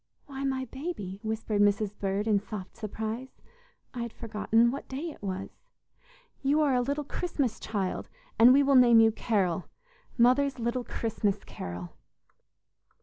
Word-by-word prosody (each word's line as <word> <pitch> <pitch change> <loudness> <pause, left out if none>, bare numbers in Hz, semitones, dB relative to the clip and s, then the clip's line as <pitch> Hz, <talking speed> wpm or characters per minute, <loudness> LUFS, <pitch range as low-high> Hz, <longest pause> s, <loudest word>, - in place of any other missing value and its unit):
"Why, 275 -1 -6
my 265 -1 -1
baby," 255 - -6
whispered 220 -1 -1
Mrs. 205 0 +2
Bird 200 +2 -1
in 210 -2 +4
soft 205 -2 -8
surprise, 220 +3 -5 0.5
"I 245 - -4
had 235 -1 -4
forgotten 225 +1 +1
what 275 - -6
day 295 +6 -4
it - - -15
was. 190 -1 -4 0.9
You 280 +3 +2
are 290 -3 +3
a 250 - +3
little 280 +4 -1
Christmas 285 -5 -2
child, 200 -4 -3 0.3
and 235 +2 +9
we 280 +2 +6
will 280 0 +3
name 245 -3 +7
you 225 0 +6
'Carol' 195 -6 0 0.5
mother's 260 +3 +4
little 240 +1 -1
Christmas 210 -4 -2
Carol!" 90 0 -7
230 Hz, 145 wpm, -29 LUFS, 205-265 Hz, 0.9 s, and